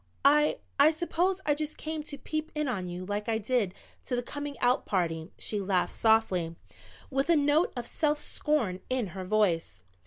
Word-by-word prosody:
"I 300 +2 +5 0.2
I 285 +2 +8
suppose 345 +4 0
I 295 - +4
just 305 +1 -4
came 315 0 -3
to 285 - -7
peep 310 +2 -4
in 300 -1 0
on 190 -8 -2
you 180 +1 -5
like 205 +2 -3
I 225 - +2
did 220 -3 0 0.3
to 250 - -1
the 245 - -1
coming 290 +2 -5
out 245 +2 +2
party." 165 -3 -1
She 210 -2 -2
laughed 190 -2 +1
softly, 190 -7 +2 0.6
with 270 +3 0
a 340 - +6
note 295 +3 +3
of 240 - -3
self 300 +2 +1
scorn 285 -12 -1
in 255 -6 0
her 190 -1 -5
voice. 175 - +1
245 Hz, 185 wpm, -29 LUFS, 190-300 Hz, 0.6 s, I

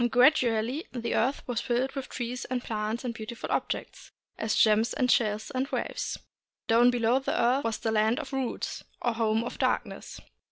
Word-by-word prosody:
Gradually 250 0 +3
the 235 -2 -3
earth 265 +5 0
was 245 -3 -1
filled 255 +1 0
with 270 -2 -6
trees 245 0 -4
and 250 -1 -3
plants 220 +2 -3
and 240 - -2
beautiful 225 +1 -6
objects, - - -3 0.2
as 220 -1 -1
gems 220 +2 +4
and 250 -4 +2
shells 215 +1 +1
and 260 0 -1
waves. - - -3 0.5
Down 235 +2 +6
below 240 +1 +2
the 270 - -1
earth 250 +4 +3
was 225 -1 -1
the 225 - -1
Land 220 +2 +2
of 280 -2 -7
Roots, 265 -2 -3 0.2
or 240 - 0
Home 225 0 +1
of 240 - -6
Darkness. - - -1
240 Hz, 175 wpm, -28 LUFS, 225-255 Hz, 0.5 s, Down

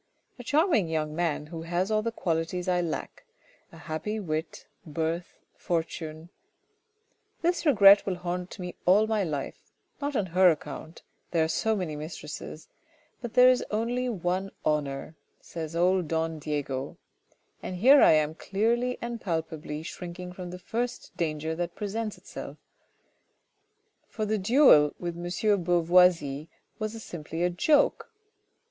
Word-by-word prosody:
A - - -7
charming 295 - +2
young 155 -1 -2
man 165 -3 -1
who 165 +1 -7
has 175 +4 -1
all 215 0 +2
the 230 +1 -2
qualities 175 -2 -2
I 180 -1 +2
lack. 170 - -5 0.5
A 165 - -13
happy 165 +7 -4
wit, 160 -4 -4 0.2
birth, 165 +2 -3 0.2
fortune 165 -1 -4 0.5
" 445 +1 -45
This 345 -1 +1
regret 200 -7 +8
will 190 - 0
haunt 180 0 -5
me 180 -1 -6
all 200 +4 +6
my 220 -2 0
life, 150 -6 -4 0.4
not 285 0 -2
on 205 - +1
her 185 0 +7
account, 155 0 -5
' - - -46
there 165 -2 +2
are - - +1
so 220 +7 0
many 180 -6 -3
mistresses!... 155 0 -7 0.5
but 240 -3 -6
there 250 0 +8
is 255 - +3
only 240 +4 -1
one 185 -2 -1 0.2
honour! 150 -1 -1 0.2
' - - -44
says 165 -1 -5
old 180 0 +2
don 160 0 -1
Diego. 140 -3 -3 0.6
And 185 - -5
here 265 +10 +7
am 155 -1 +5
I - - -14
clearly 235 +5 0
and 235 -1 -4
palpably 160 -3 -4
shrinking 180 +1 -7
from 180 -1 -7
the 180 - -7
first 235 +7 -4
danger 160 -1 -2
that 170 +1 -4
presents 215 +1 -3
itself; - - -9 1.5
for 215 - -3
the 215 0 0
duel 195 - +5
with 175 -1 -4
M. 170 - -7
de 200 +4 +1
Beauvoisis 170 -4 +3 0.3
was 215 +1 -4
simply 165 0 -5
a 180 - +2
joke. 290 - +2
175 Hz, 150 wpm, -28 LUFS, 160-215 Hz, 1.5 s, regret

